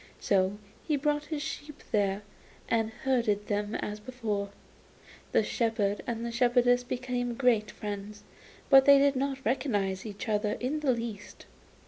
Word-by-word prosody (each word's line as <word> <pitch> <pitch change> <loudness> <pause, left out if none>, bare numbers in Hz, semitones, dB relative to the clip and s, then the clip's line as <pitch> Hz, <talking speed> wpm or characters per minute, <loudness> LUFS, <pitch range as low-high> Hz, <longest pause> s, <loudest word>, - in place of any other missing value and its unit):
So 195 0 +1 0.3
he 305 - +2
brought 295 +1 0
his 295 -1 -3
sheep 300 -1 -7
there, 200 -2 +1 0.4
and 225 -1 +1
herded 230 -3 0
them 205 0 -2
as 210 0 -4
before. 210 -4 -3 0.8
The - - +3
shepherd 220 -4 0
and 235 0 -3
shepherdess 245 0 +3
became 245 -1 -3
great 230 -4 +2
friends, 205 0 -6 0.5
but 270 -1 +8
they 280 -1 +8
did 280 0 +4
not 270 0 -2
recognise 205 -6 0
each 210 +1 -7
other 210 -1 +1
in 275 +5 -2
the 290 -3 +2
least. 230 -4 -5
235 Hz, 140 wpm, -29 LUFS, 210-260 Hz, 0.8 s, but